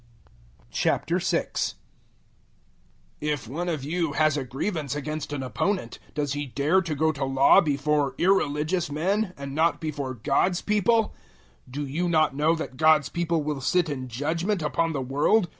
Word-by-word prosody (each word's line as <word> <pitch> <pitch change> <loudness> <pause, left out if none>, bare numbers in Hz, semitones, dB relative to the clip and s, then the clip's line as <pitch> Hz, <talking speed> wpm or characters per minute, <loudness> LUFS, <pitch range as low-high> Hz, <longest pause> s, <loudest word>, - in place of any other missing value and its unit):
006:001 - - 0 1.5
If 150 -5 -2
one 170 +8 -3
of 155 -5 -2
you 165 0 -1
has 155 0 +3
a 145 - -1
grievance 140 +3 -3
against 150 0 -4
an 140 -2 -3
opponent, 125 - -2 0.2
does 145 -2 -1
he 145 0 -3
dare 150 +9 +2
to 165 -4 -3
go 160 +2 +2
to 140 -2 -4
law 135 +1 +5
before 145 -2 0
irreligious 165 -2 +1
men 190 +7 0
and 140 -1 -6
not 160 +3 +2
before 145 -4 -4
God's 175 - +1
people? 210 +2 +2 0.6
006:002 - - -15
Do 145 +1 -3
you 165 +6 -1
not 155 -4 +2
know 155 +3 +3
that 155 -5 -6
God's 155 -2 +4
people 170 -1 -1
will 145 -2 -3
sit 175 +5 +1
in 130 -3 -4
judgement 165 - -1
upon 160 +3 0
the 135 -3 -2
world? 150 - +2
150 Hz, 160 wpm, -26 LUFS, 140-170 Hz, 1.5 s, law